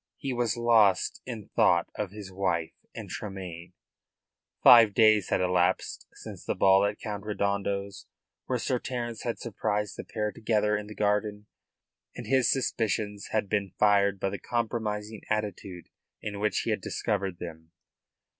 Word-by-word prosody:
He 135 -2 -3
was 120 -1 0
lost 110 -5 +3
in 115 -5 -7
thought 85 0 +3
of 105 -2 -3
his 100 -1 -9
wife 90 -4 -1 0.2
and - - -7
Tremayne. 90 -4 -7 0.9
Five 115 -4 +8
days 110 -4 +5
had - - +1
elapsed 90 -2 0
since - - -10
the - - -2
ball 95 0 +5
at 100 0 -1
Count 105 -3 -5
Redondo's, 100 -2 -2 0.4
where - - 0
Sir 125 - -1
Terence 120 -3 -4
had 120 -2 -3
surprised 105 -2 -2
the - - -5
pair 105 -1 -3
together 105 -1 +1
in 105 0 -4
the 105 - -9
garden 105 0 0 0.7
and - - -7
his 130 -1 +3
suspicions 105 -5 -1
had 110 -2 0
been 100 -2 -1
fired 100 -2 +3
by 95 - 0
the 100 - -5
compromising 110 -1 -3
attitude 100 -4 -3 0.3
in 100 -1 -5
which 105 +1 +1
he 115 - -2
had 105 - -1
discovered 100 -3 -2
them. 80 -2 -9
105 Hz, 155 wpm, -28 LUFS, 95-110 Hz, 0.9 s, Five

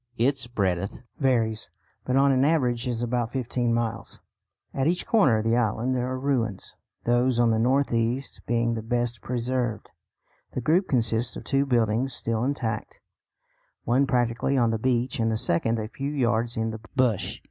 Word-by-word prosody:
Its 130 +1 +1
breadth 100 -5 -1 0.2
varies, 115 - +1 0.4
but 130 - 0
on 140 +1 +5
an 130 0 +3
average 130 -6 +1
is 120 -1 -2
about 120 -1 -1
fifteen 120 -1 -1
miles. 115 -1 -2 0.5
At 135 +1 0
each 175 +2 0
corner 190 - +4
of 110 - -1
the 115 +1 +2
island 120 +2 0
there 125 0 -1
are 130 - -2
ruins, 120 -7 -1 0.3
those 120 +1 +2
on 120 -1 +4
the 110 - +1
north 130 +3 +2
east 115 +4 -1
being 115 0 +1
the 115 - -3
best 120 0 -2
preserved. 120 -1 -2 0.6
The 130 - -2
group 170 - +2
consists 115 -2 +2
of - - -7
two 140 0 +1
buildings 120 +1 +1
still 115 0 -1
intact, 120 -5 -3 0.8
one 130 +4 +2
practically 120 +2 +1
on 120 -2 +3
the 110 - -1
beach 125 +1 0
and 115 0 +1
the 110 - 0
second 115 +4 +1
a 110 -1 -3
few 140 +4 -4
yards 120 -4 0
in 110 0 -1
the 110 0 -7
bush. 125 -7 +1
120 Hz, 175 wpm, -26 LUFS, 115-130 Hz, 0.8 s, on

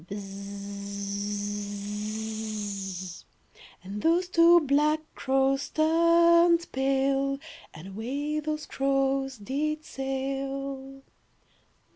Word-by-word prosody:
And 200 +3 -6
those 345 +3 +3
two 340 +1 +7
black 300 +2 +2
crows 270 0 +1
Turned 335 +1 +4
pale, 270 +1 +1 0.3
And 165 +5 -10
away 280 +9 -2
those 305 0 -3
crows 270 -1 0
did 300 +8 -2
sail. 270 0 -4
275 Hz, 65 wpm, -28 LUFS, 270-310 Hz, 0.3 s, two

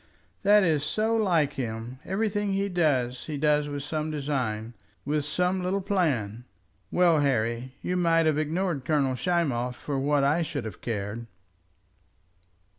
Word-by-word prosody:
"That 205 0 +5
is 155 -5 +2
so 215 +9 0
like 175 -10 +2
him. 120 0 -5
Everything 205 0 -1
he 200 +1 0
does 130 -9 0
he 150 -2 -4
does 150 0 +2
with 145 -1 -4
some 155 +1 -2
design, 130 -7 -2 0.3
with 145 +1 0
some 180 +5 0
little 185 +2 0
plan. 140 - 0 0.5
Well, 175 -3 +4
Harry, 125 -2 0
you 180 - -1
might 165 -2 +3
have 155 -1 +2
ignored 160 -1 -1
Colonel 140 -2 +1
Schmoff 130 -5 0
for 140 +1 -3
what 145 +1 +2
I 150 +5 +3
should 150 -7 -3
have 110 -5 -8
cared." 110 +1 -4
150 Hz, 145 wpm, -27 LUFS, 130-180 Hz, 0.5 s, That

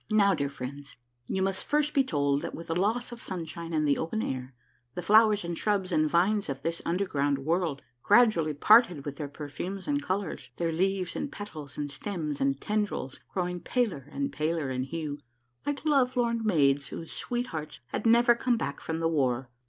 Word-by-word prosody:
Now, 205 -2 +4
dear 140 -4 -1
friends, 140 +1 -8 0.3
you 190 - 0
must 195 0 0
first 300 +1 +1
be 275 - +4
told 145 - +1
that - - -5
with 165 - -8
the 165 - -2
loss 220 +7 0
of 240 - -8
sunshine 170 -2 -5
and 155 -2 +1
the 140 - +2
open 190 +7 -2
air, 130 0 -4 0.4
the 180 - -4
flowers 215 -1 +5
and 170 0 -3
shrubs 200 -1 0
and 155 -2 +3
vines 195 +3 +2
of 135 0 -4
this 165 0 -2
underground 150 -6 +1
world 165 -3 0 0.2
gradually 200 - +4
parted 180 - +5
with 145 -1 -5
their 145 - -4
perfumes 155 +7 -6
and 290 -1 +1
colors, 185 - -3
their 170 -1 0
leaves 185 +1 0
and 285 - -3
petals 155 -9 -8
and 145 -1 -3
stems 150 -2 -4
and 135 0 +1
tendrils 205 -11 -2
grow 180 -2 -1
ing 180 0 -4
paler 195 - -1
and 280 - -2
paler 155 -3 -1
in 130 0 -1
hue, 150 -1 -4 0.5
like 290 +1 -2
lovelorn 250 -5 +2
maids 140 -9 +3
whose 165 +5 -6
sweet 245 0 -2
hearts 155 -1 -5
had 220 - -1
never 240 +1 +6
come 240 0 +1
back - - -3
from 160 - -3
the 165 0 +1
war. 130 -5 0
170 Hz, 190 wpm, -29 LUFS, 145-210 Hz, 0.5 s, never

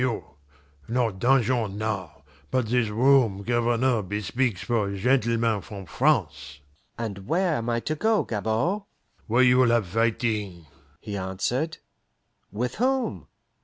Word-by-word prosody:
Not 115 -4 0
dungeon 120 -4 +2
now, 110 -3 -4 0.3
but 130 -2 +1
this 120 0 +1
room 115 -3 +3
Governor 120 +1 +1
bespeaks 105 +1 -2
for 105 -4 -1
gentlemen 115 -1 +1
from 100 -3 -9
France." 70 -4 0 0.4
"And 100 -4 -5
where 175 -1 +1
am 115 +1 -3
I 115 0 0
to 155 - -2
go, 220 +7 +2
Gabord?" 115 - -1 0.5
"Where 120 +3 +4
you 125 0 +5
will 125 -2 +5
have 115 -3 +2
fighting," 105 -3 -1 0.4
he 105 - -6
answered. 110 - -2 0.7
"With 120 +5 -3
whom?" 250 - 0
115 Hz, 125 wpm, -25 LUFS, 105-125 Hz, 0.7 s, you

